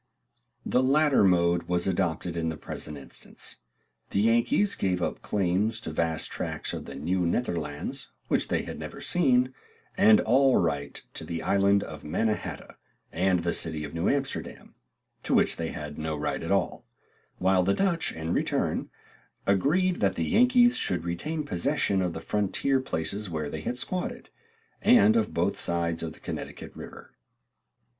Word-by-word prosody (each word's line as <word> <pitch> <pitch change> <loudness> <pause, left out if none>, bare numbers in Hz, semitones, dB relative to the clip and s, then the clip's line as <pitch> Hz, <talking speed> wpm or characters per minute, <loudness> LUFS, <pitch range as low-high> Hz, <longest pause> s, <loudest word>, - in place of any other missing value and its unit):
The 125 - +2
latter 140 0 +4
mode 85 -2 +3
was 90 -1 0
adopted 90 -2 -1
in 80 -1 -1
the 80 - -4
present 75 -1 -7
instance. 70 - -9 0.5
The - - 0
Yankees 120 - +3
gave 90 -2 0
up 85 - -2
claims 105 +3 0
to 80 - -5
vast 80 0 -1
tracts - - -4
of - - -5
the - - -8
Nieuw 85 +7 -1
Nederlandts 85 -8 -2 0.2
which - - +1
they - - 0
had - - -7
never - - -7
seen, 130 -7 +3 0.4
and 110 -1 +6
all 130 +3 +4
right 70 -1 -1
to - - -4
the 85 -1 -4
island 100 0 +3
of 75 -2 -9
Manna 105 +8 +1
hata - - -8 0.3
and 90 0 +1
the 85 - 0
city 80 -2 -2
of 75 - -7
New 85 +2 0
Amsterdam, 135 -1 -3 0.5
to - - 0
which - - +3
they 85 - -2
had 75 -1 -7
no 80 0 -2
right 75 - -2
at - - -4
all; - - 0 0.5
while 95 0 +3
the 95 +2 +2
Dutch, 180 -5 +1
in 80 +1 -3
return, - - 0 0.6
agreed 165 - +2
that 100 -2 +2
the 85 - -1
Yankees 245 - +5
should 90 - 0
retain 150 - -3
possession 95 -3 0
of 90 -2 -1
the - - -6
frontier 105 +6 +1
places 100 -4 -3
where 75 -3 -3
they 80 - -5
had 125 +9 -3
squatted, 180 +7 -4 0.5
and 220 -1 +6
of 230 - +1
both 90 +4 0
sides 85 -1 -1
of 80 -1 -4
the - - -17
Connecticut - - -7
river. - - -11
95 Hz, 165 wpm, -27 LUFS, 85-130 Hz, 0.6 s, and